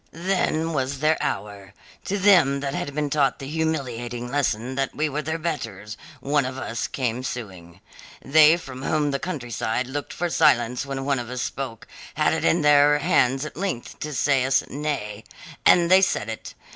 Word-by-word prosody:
"Then 165 -2 0
was 135 -1 -1
their 155 +3 +2
hour. 100 -2 -4 0.3
To 200 - -1
them 175 -9 +4
that 140 -1 -3
had 145 -1 -4
been 150 -1 -1
taught 140 -2 +2
the 135 - -8
humiliating 125 -6 -3
lesson 130 -3 -1
that 135 0 -2
we 155 - 0
were 150 +2 -2
their 160 +2 -3
betters, 110 - -5 0.3
one 145 +2 +1
of 130 +1 -5
us 115 -3 -3
came 125 0 -2
suing. 95 -8 -7 0.4
They 155 +3 +5
from 130 -6 -9
whom 150 +1 0
the 140 - -1
countryside 125 -7 -3
looked 145 +3 -5
for 175 - -2
silence 125 -4 +2
when 135 -1 -4
one 140 -2 +1
of 120 -1 -6
us 125 0 -3
spoke, 130 -5 -5 0.3
had - - +2
it - - -2
in 80 - +2
their 145 0 +5
hands 140 -4 +2
at 150 - -8
length 185 -9 -4
to 150 - -4
say 135 -1 +2
us 130 +1 +2
nay. 135 -8 -4 0.4
And 175 0 +5
they 190 +1 +7
said 115 - 0
it. 110 - -7
135 Hz, 185 wpm, -24 LUFS, 120-155 Hz, 0.4 s, they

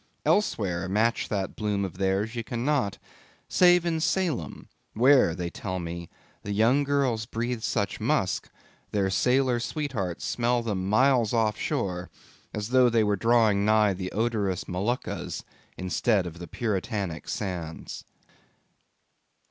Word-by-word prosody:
Elsewhere 95 - +1
match 110 +4 +1
that 100 -2 -2
bloom 105 -2 -1
of 95 0 -8
theirs, 100 +3 0
ye 115 - -1
cannot, 120 -2 -1 0.5
save 175 -1 +5
in 165 -2 0
Salem, 160 - -1 0.3
where 125 - +5
they 85 -1 -4
tell 95 -2 -4
me 85 -1 -6 0.3
the 100 - -5
young 115 +7 +3
girls 135 -6 0
breathe 120 +1 -3
such 105 -2 -1
musk, - - 0 0.4
their 100 -2 0
sailor 125 +4 +2
sweethearts 120 - -3
smell 120 0 +1
them 95 -4 -2
miles 125 0 +3
off 110 -2 +2
shore, 90 -4 -2 0.4
as 105 +1 -4
though 125 -1 +5
they 115 -2 +3
were 105 -1 +2
drawing 110 -1 +3
nigh 105 -1 +4
the 95 0 -5
odorous 105 -5 -1
Moluccas 100 +8 -3 0.3
instead 95 +3 +1
of 85 -1 -7
the 85 - -7
Puritanic 100 -5 -3
sands. 90 -5 -5
105 Hz, 130 wpm, -27 LUFS, 95-120 Hz, 0.5 s, save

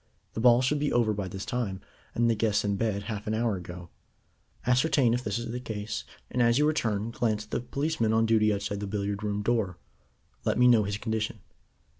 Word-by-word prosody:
The - - -4
ball 120 +1 +5
should 145 +3 +1
be 145 0 0
over 115 -3 +2
by 100 -2 -3
this 95 +1 -6
time, 110 -6 -2 0.4
and 120 0 +3
the 115 - +4
guests 105 -1 +1
in 100 -1 +1
bed 100 -1 -1
half 105 0 -5
an 110 - 0
hour 115 -2 +1
ago. 90 -1 -9 0.8
Ascertain 125 0 +3
if 125 +1 -1
this 100 -1 -1
is 120 -1 -4
the 125 - -3
case, 110 -3 -5 0.3
and 125 - +1
as 120 0 +4
you 150 - +4
return 115 -8 0
glance 110 -3 0
at 110 - -27
the - - 0
policeman 140 -2 -1
on 110 0 +3
duty 110 -1 +3
outside 100 0 -2
the 100 - -4
billiard 100 0 -2
room 105 -1 -2
door. 105 -6 0 0.7
Let - - 0
me 125 0 +6
know 115 -4 +5
his 100 0 -2
condition." 110 0 -2
110 Hz, 215 wpm, -28 LUFS, 105-120 Hz, 0.8 s, me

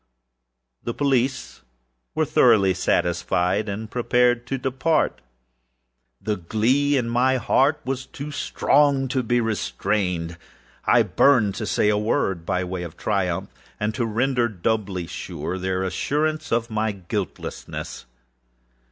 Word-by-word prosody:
The 120 - -3
police 135 - 0 0.5
were - - +2
thoroughly 95 -3 +4
satisfied 90 +3 0
and 105 +3 -4
prepared 120 +1 +1
to 135 - -1
depart. 130 - 0 1.0
The 105 -1 -2
glee 125 +11 +1
at 125 - 0
my 125 +3 +2
heart 140 +4 +2
was 130 0 -3
too 145 +2 -7
strong 140 -1 +2
to 130 0 +1
be 120 0 +1
restrained. 95 -6 -1 0.5
I - - +5
burned 115 -8 +3
to 110 - -3
say 105 - +2
if - - +3
but - - +1
one 105 - -2
word, 95 - 0
by 90 - 0
way 90 0 -4
of 85 -1 -7
triumph, 95 -5 -1 0.3
and 105 +1 -1
to 120 0 -1
render 120 +2 +1
doubly 100 -3 -2
sure 90 +3 -5
their 95 0 -1
assurance 155 +11 -1
of 115 0 0
my 110 0 0
guiltlessness. 90 -5 -5
110 Hz, 135 wpm, -23 LUFS, 95-130 Hz, 1.0 s, I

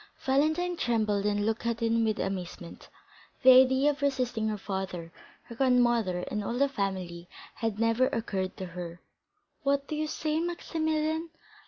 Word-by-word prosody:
Valentine 315 +7 +2
trembled, 215 -7 0
and 205 0 0
looked 225 +1 -1
at 235 -1 -1
him 230 0 +2
with 220 -1 +1
amazement. 180 -3 -5 0.5
The 260 - +9
idea 260 +3 +6
of 290 0 -9
resisting 250 -5 0
her 215 -1 -1
father, 190 -4 -5 0.3
her - - -11
grandmother, 240 -7 +2
and 210 +3 -3
all 235 +4 -3
the 280 +2 +4
family, 185 -7 -4 0.2
had 225 -3 -3
never 230 +3 +3
occurred 190 -6 -3
to 190 - -4
her. 175 -1 -7 0.6
"What 280 0 +1
do 305 - -3
you 310 0 -1
say, 310 0 -1
Maximilian?" 320 -1 -1
230 Hz, 155 wpm, -29 LUFS, 200-280 Hz, 0.6 s, The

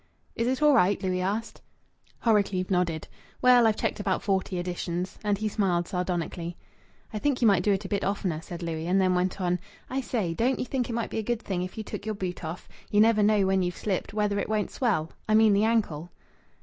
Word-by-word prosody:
"Is 230 - 0
it 260 +4 0
all 300 -1 +6
right?" 200 -5 +4
Louis 185 -1 0
asked. 210 +5 -3 0.6
Horrocleave 200 -5 +2
nodded. 175 -4 0 0.3
"Well, 250 -2 +6
I've 220 - +2
checked - - -2
about 195 -2 -1
forty 190 -1 0
additions." 175 0 -3
And 205 -1 +1
he 215 +2 -1
smiled 185 -5 0
sardonically. 175 -1 -3 0.6
"I 215 - -2
think 280 +2 +1
you 235 - +4
might 195 -4 +4
do 205 - +2
it 195 - 0
a - - -2
bit 200 - -1
oftener," 190 -5 -1
said 175 +1 -7
Louis, 165 -1 -3
and 190 +2 +3
then 185 -1 +3
went 180 +2 0
on: 180 -1 0 0.3
"I 265 +1 0
say, 215 -9 -1
don't 245 +8 +1
you - - -2
think 255 -2 -2
it - - -3
might 235 0 -2
be - - -2
a - - 0
good 235 +1 -2
thing 185 -3 -2
if 185 +3 -6
you 220 - -3
took 210 - -7
your 215 - -1
boot 185 -2 -4
off. 160 +2 -6 0.2
You 205 - +2
never 220 0 +5
know, 205 -1 +4
when 190 0 +2
you've 180 -1 -2
slipped, 195 -4 -2
whether 205 -1 0
it - - -3
won't 215 -1 0
swell 205 -11 0 0.2
I 215 - +4
mean 220 -1 +6
the 205 +2 +3
ankle." 190 -8 0
200 Hz, 230 wpm, -27 LUFS, 180-220 Hz, 0.6 s, all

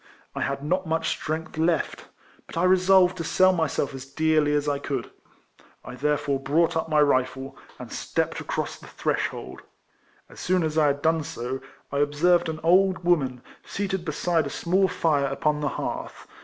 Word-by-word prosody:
I - - -4
had 140 0 -2
not 180 +4 -1
much 160 0 0
strength 155 0 -4
left; 165 -1 0 0.4
but - - -9
I 170 - +1
resolved 185 0 +5
to 165 - -3
sell 185 +3 +4
myself 160 -5 -1
as 135 -1 -7
dearly 155 +2 +1
as 145 0 0
I 145 -1 0
could. 135 -4 -4 0.7
I - - -8
therefore 145 +1 0
brought 155 +5 +1
up 160 0 -1
my 155 -1 +3
rifle, 130 -1 +1 0.2
and - - -9
stepped - - -2
across - - -4
the - - -13
threshold. - - -3 0.7
As - - -14
soon 180 -1 +1
as 155 -1 -2
I 155 -2 +4
had 145 0 -1
done 160 0 +3
so, 130 -2 -5 0.3
1 140 0 0
observed 160 +4 +2
an 155 -1 -4
old 185 +2 +3
woman 135 -8 +1 0.2
seated 190 -3 -3
beside 160 -1 0
a - - -4
small 185 +6 +1
fire 145 -6 +1
upon 150 +2 0
the 145 - 0
hearth. - - -5
155 Hz, 175 wpm, -25 LUFS, 140-175 Hz, 0.7 s, resolved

